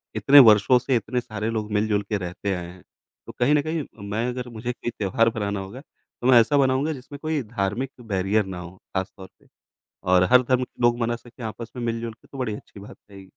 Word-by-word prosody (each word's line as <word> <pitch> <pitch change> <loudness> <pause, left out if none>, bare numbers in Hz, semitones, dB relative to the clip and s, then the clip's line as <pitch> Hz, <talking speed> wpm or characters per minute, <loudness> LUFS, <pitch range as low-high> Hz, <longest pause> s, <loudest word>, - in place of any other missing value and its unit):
इतने 120 +7 +7
वर्षों 110 0 +7
से 130 0 0
इतने 120 +3 -1
सारे 110 -1 -4
लोग 110 -2 -3
मिल-जुल 105 0 +1
के 105 - 0
रहते 90 +2 -4
आए 90 -2 -4
हैं, 90 +1 -13 0.4
तो - - -6
कहीं 125 +4 +3
न 145 - +3
कहीं 155 0 -2 0.3
मैं 115 +4 -1
अगर 125 0 -5
मुझे 115 +2 -4
कोई 120 - -5
त्यौहार 115 +3 +2
बनाना 105 -3 -3
होगा, 100 +8 -8
तो 125 - -9
मैं 125 -2 +8
ऐसा 145 +6 +3
बनाऊँगा 135 +3 +2
जिसमें 140 +1 -10
कोई 155 -2 -1
धार्मिक 110 +4 -3
तो 125 - -14
बैरियर 100 0 0
ना 95 -2 -6
हो 90 +1 -9 0.2
ख़ास 95 0 -1
तौर 95 -1 -11
पे - - -26 0.6
और 90 0 +5
हर 125 - +8
धर्म 130 +1 +1
के 125 - -11
लोग 120 0 +3
मना 120 0 0
सके 120 0 -13
आपस 115 +1 -6
में 125 - -5
मिल-जुल 115 0 -3
के - - -24
तो 135 - -11
बड़ी 115 -5 -2
अच्छी 100 - -13
बात 100 - -12
है। 95 -1 -11
115 Hz, 235 wpm, -24 LUFS, 100-125 Hz, 0.6 s, मैं